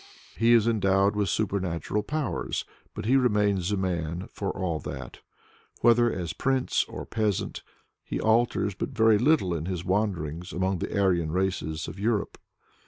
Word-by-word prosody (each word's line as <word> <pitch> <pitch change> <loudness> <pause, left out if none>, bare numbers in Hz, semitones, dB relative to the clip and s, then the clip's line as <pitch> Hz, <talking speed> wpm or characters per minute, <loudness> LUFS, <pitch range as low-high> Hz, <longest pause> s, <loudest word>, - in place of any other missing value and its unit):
He 115 +1 +4
is 115 -1 +5
endowed 100 -2 +2
with 105 -1 0
supernatural 95 -2 -1
powers, 145 +4 -2 0.3
but 105 - -5
he 125 +4 +3
remains 105 -6 +2
a 105 - +1
man, 90 0 -2
for 100 - -3
all 85 -4 -2
that. 65 -5 -7 0.6
Whether 120 0 +5
as 85 -3 -4
prince 135 -1 +1
or - - -7
peasant, 105 -4 -1 0.4
he - - -4
alters 110 -2 +2
but - - -4
very 110 -4 +4
little 125 - +3
in 80 0 -3
his 90 -1 -3
wanderings 90 -4 -1
among 95 0 0
the 100 - -2
Aryan 85 -5 +2
races 85 -4 -1
of 95 - -8
Europe. 105 0 -1
100 Hz, 155 wpm, -27 LUFS, 90-110 Hz, 0.6 s, is